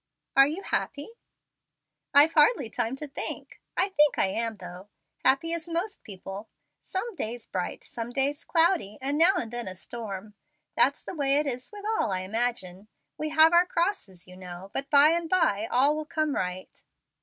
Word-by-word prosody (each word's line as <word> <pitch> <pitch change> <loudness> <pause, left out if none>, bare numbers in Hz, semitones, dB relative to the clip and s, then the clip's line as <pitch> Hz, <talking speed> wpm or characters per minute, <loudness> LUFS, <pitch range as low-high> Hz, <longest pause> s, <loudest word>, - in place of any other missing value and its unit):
"Are 275 0 +7
you 330 +7 -4
happy?" 285 +5 -3 1.0
"I've 295 +3 +6
hardly 295 - +3
time 240 +1 -1
to 300 +2 -7
think. 275 - -7 0.2
I 395 - +2
think 300 -6 +3
I - - +3
am, 225 +3 -2
though, 185 +1 -10 0.3
happy 275 +6 +3
as 335 0 -4
most 350 +6 -3
people. 195 +1 -9 0.3
Some 445 +5 -4
days 235 -5 -5
bright, 180 -1 -4
some 230 0 -6
days 280 +4 0
cloudy, 330 - +1
and 275 +2 -1
now 340 +5 +5
and 230 -10 -3
then 240 -2 -4
a 185 - -5
storm. 210 0 -7 0.4
That's - - +3
the - - -6
way 280 -4 +1
it 295 +1 +2
is 255 -2 -4
with 410 -1 -10
all, 440 - 0
I 185 -1 -1
imagine. 205 -2 -3 0.3
We 310 - -2
all 310 - -7
have 320 +1 +7
our 350 +1 +5
crosses, 335 - -2
you 180 - -13
know, 185 +1 -10
but 275 0 -3
by 290 +1 +7
and 335 0 0
by 225 - +2
all 275 +5 +3
will 310 0 -4
come 310 0 -1
right." 185 -3 -4
275 Hz, 185 wpm, -27 LUFS, 210-325 Hz, 1.0 s, Are